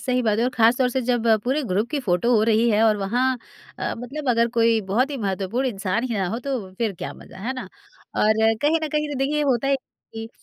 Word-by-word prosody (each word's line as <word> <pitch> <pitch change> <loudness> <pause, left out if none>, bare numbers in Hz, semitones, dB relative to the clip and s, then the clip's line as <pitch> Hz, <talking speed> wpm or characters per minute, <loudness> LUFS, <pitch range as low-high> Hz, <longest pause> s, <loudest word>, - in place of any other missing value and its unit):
सही 255 -1 0
बात 215 -2 +1
है 235 - +2
और 250 - +1
खासतौर 240 +3 +4
से 260 +1 -1
जब 240 -1 0 0.2
पूरे 270 +5 0
ग्रुप 210 +1 -1
की 295 -1 -1
फोटो 200 0 +1
हो 215 - +3
रही 225 +1 +3
है 215 +1 +3
और 220 -1 +4
वहाँ 245 +6 0 0.4
अ, - - -2
मतलब 275 +4 -5
अगर 235 0 +3
कोई 230 -1 +4
बहुत 250 +8 +2
ही 285 - -3
महत्वपूर्ण 200 +3 -2
इंसान 205 +1 -2
ही 245 -3 -2
ना 190 - 0
हो 225 +5 -3
तो 255 -9 -3
फिर 225 -3 0
क्या - - -5
मज़ा, - - -14
है 235 +7 -3
ना? 255 - -7 0.5
और 215 +1 +3 0.3
कहीं 310 +3 +3
न - - -2
कहीं 300 0 -1
तो 275 - -4
देखिए 295 +3 0
होता 270 -3 +1
है 275 - +3
कि, 225 -3 -11
235 Hz, 240 wpm, -23 LUFS, 215-265 Hz, 0.5 s, खासतौर